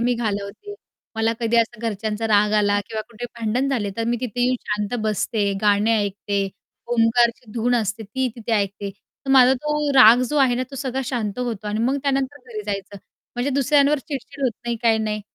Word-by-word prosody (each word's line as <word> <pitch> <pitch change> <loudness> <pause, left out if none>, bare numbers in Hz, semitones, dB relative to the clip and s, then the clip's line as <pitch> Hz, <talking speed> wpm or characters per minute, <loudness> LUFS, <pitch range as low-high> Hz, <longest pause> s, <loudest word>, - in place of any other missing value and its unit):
मी 245 +1 +2
घालवते, 215 - -4 0.4
मला 225 +1 +1
कधी 230 0 +1
असं 230 -1 +1
घरच्यांचा 220 0 -2
राग 210 -1 +3
आला 205 0 +2
किंवा 220 - -4
कुठे 235 +1 -8
भांडण 235 +5 0
झाले 225 -7 -1
तर 230 - -1
मी 240 0 +1
तिथे 245 -1 -4
येऊन 255 0 +2
शांत 210 +1 -1
बसते, 210 -1 0
गाणे 210 +2 +3
ऐकते, 200 0 -2 0.4
ओमकारची 235 0 +2
धून 245 +1 +1
असते 220 -1 -1
ती 255 +5 -2
तिथे 230 0 -4
ऐकते. 200 -1 -1
तर 270 +7 -11
माझा 260 -1 +7
तो 300 +3 -2 0.2
राग 245 -1 +8
जो 300 - -1
आहे 260 -3 +4
ना 250 - -1
तो 275 - -8
सगळा 265 -1 -2
शांत 240 -4 -3
होतो 230 -4 -3
अन् 210 +1 -2
मग 270 +3 +1
त्यानंतर 275 0 -1
घरी 215 -2 -6
जायचं 200 0 -4 0.4
म्हणजे 245 +3 -1
दुसऱ्यांवर 280 +2 +3
चिडचिड 280 -1 -7
होत 255 - +3
नाही 235 0 -1
काही 225 -2 +4
नाही. 215 -1 -2
230 Hz, 190 wpm, -22 LUFS, 210-255 Hz, 0.4 s, राग